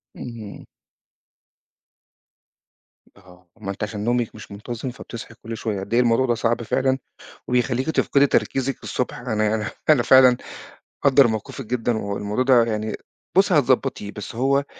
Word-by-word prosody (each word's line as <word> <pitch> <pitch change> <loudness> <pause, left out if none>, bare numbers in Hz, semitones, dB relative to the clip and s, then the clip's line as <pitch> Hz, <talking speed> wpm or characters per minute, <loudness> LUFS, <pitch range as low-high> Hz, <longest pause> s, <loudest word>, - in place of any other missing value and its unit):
اهم. 115 -4 -9 2.5
آه، 90 -2 -19
ما 100 - -3
أنتِ 100 - -6
عشان 105 0 -4
نومِك 120 0 0
مش - - -11
منتظم 115 +5 -6
فبتصحي 115 -1 -9
كل 115 0 -6
شوية. 110 -3 -3
قد 95 +4 -6
إيه 120 - +4
الموضوع 120 +2 +3
ده 120 -2 +1
صعب 115 +1 0
فعلًا 130 +3 +1 0.5
وبيخلّيكِ 125 +3 0
تفقدي 140 -2 +3
تركيزِك 135 -1 0
الصبح، 125 - -3
أنا 110 -3 -1
يعني 105 0 0 0.2
أنا 145 -6 +5
فعلًا 130 -1 +7 0.7
مقدّر 140 -1 +6
موقفِك 110 +4 -5
جدًا 120 0 -1
والموضوع 105 +3 -2
ده 125 -3 +5
يعني 110 -1 -3 0.4
بُصّي 195 -1 +5
هتضبّطيه، 130 -6 +1
بس 105 +1 -8
هو 135 +4 +2
120 Hz, 140 wpm, -22 LUFS, 105-130 Hz, 2.5 s, فعلًا